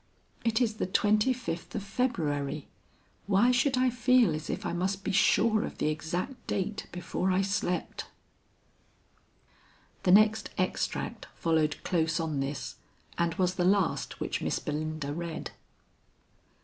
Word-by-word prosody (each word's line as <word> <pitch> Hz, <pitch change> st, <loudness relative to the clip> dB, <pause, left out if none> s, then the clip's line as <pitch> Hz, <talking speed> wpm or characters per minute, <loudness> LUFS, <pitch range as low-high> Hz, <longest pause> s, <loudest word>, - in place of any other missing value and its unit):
"It 230 Hz, -1 st, +2 dB
is 225 Hz, -4 st, +1 dB
the -, -, -1 dB
twenty 210 Hz, +5 st, +3 dB
fifth 235 Hz, -10 st, -4 dB
of 210 Hz, -, -2 dB
February. 155 Hz, -, -1 dB, 0.6 s
Why 205 Hz, +5 st, +4 dB
should 255 Hz, +2 st, +2 dB
I 255 Hz, 0 st, +3 dB
feel 245 Hz, -5 st, +4 dB
as 155 Hz, 0 st, -5 dB
if -, -, -3 dB
I -, -, -1 dB
must 190 Hz, +3 st, -1 dB
be -, -, -1 dB
sure 215 Hz, +2 st, +4 dB
of -, -, -6 dB
the -, -, +1 dB
exact 175 Hz, -, -4 dB
date 205 Hz, +2 st, -2 dB
before 180 Hz, +1 st, -2 dB
I 185 Hz, +1 st, +2 dB
slept?" 190 Hz, -2 st, -2 dB, 1.9 s
The 180 Hz, -, +3 dB
next 215 Hz, +2 st, +5 dB
extract -, -, -2 dB
followed 160 Hz, -3 st, +1 dB
close 165 Hz, -2 st, +1 dB
on 160 Hz, -3 st, -1 dB
this 135 Hz, +1 st, -4 dB, 0.4 s
and 170 Hz, -1 st, +1 dB
was 185 Hz, -1 st, +1 dB
the 180 Hz, -, -1 dB
last 190 Hz, -1 st, +1 dB
which -, -, -2 dB
Miss -, -, 0 dB
Belinda 155 Hz, -1 st, -3 dB
read. 170 Hz, 0 st, -5 dB
185 Hz, 140 wpm, -29 LUFS, 160-215 Hz, 1.9 s, next